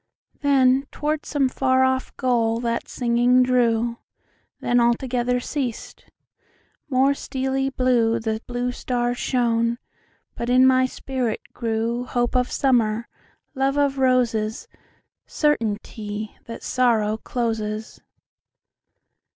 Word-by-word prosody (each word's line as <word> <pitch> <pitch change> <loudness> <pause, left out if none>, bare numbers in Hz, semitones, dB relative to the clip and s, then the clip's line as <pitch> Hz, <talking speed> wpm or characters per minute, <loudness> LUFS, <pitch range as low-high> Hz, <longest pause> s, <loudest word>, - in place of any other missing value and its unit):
Then 270 -1 +3
toward 300 0 -2
some 285 -3 +1
far 260 0 +2
off 260 0 0
goal 230 -3 +1
that 235 -1 -2
singing 245 +1 +3
drew; 235 -2 +1 0.6
Then 245 0 +2
altogether 245 +1 +1
ceas'd; 250 -3 -5 0.8
more 270 +1 +3
steely 270 0 -2
blueThe 230 -4 +1
blue 245 0 -2
stars 245 -1 -2
shone; 235 -2 +1 0.6
but 235 - -4
in 255 +1 +5
my 260 0 +4
spirit 255 -4 -3
grewHope 235 +2 -1
of 250 0 +1
Summer, 235 -4 +1 0.5
love 270 +1 0
of 280 -1 +1
Roses, 245 - +1 0.6
Certainty 215 -6 -2
that 230 - -8
Sorrow 225 -4 +1
closes. 220 -2 -3
245 Hz, 100 wpm, -23 LUFS, 230-260 Hz, 0.8 s, in